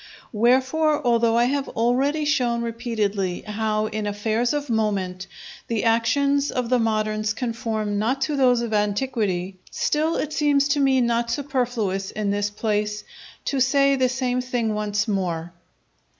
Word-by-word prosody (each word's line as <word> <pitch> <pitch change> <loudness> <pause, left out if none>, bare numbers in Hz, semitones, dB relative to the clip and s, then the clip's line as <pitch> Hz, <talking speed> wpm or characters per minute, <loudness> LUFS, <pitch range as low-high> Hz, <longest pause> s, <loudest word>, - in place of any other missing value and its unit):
Wherefore, 265 +6 +2
although 235 -1 +3
I 235 - +4
have 275 +2 0
already 270 +6 +1
shown 245 -5 +1
repeatedly 215 -5 -2
how 215 0 -1
in 215 -1 -3
affairs 220 +3 0
of 290 -1 -2
moment 195 -5 -1 0.4
the 225 -3 -1
actions 280 +5 +2
of 250 -2 -2
the 250 -1 +3
moderns 215 -1 0
conform 220 -3 -2
not 245 +6 0
to 295 +2 0
those 250 -3 +3
of 235 -2 -3
antiquity, 205 -3 -1
still 315 +2 0
it 305 0 -2
seems 285 -2 +2
to 290 0 +2
me 265 -2 +3
not 235 0 +1
superfluous, 240 -9 -1
in 210 -2 -2
this 205 0 0
place, 210 0 -2 0.4
to 275 - -1
say 275 +2 +3
the 260 -1 +2
same 250 0 -1
thing 245 -3 -1
once 210 +1 -1
more. 175 -4 -2
230 Hz, 150 wpm, -23 LUFS, 210-260 Hz, 0.4 s, I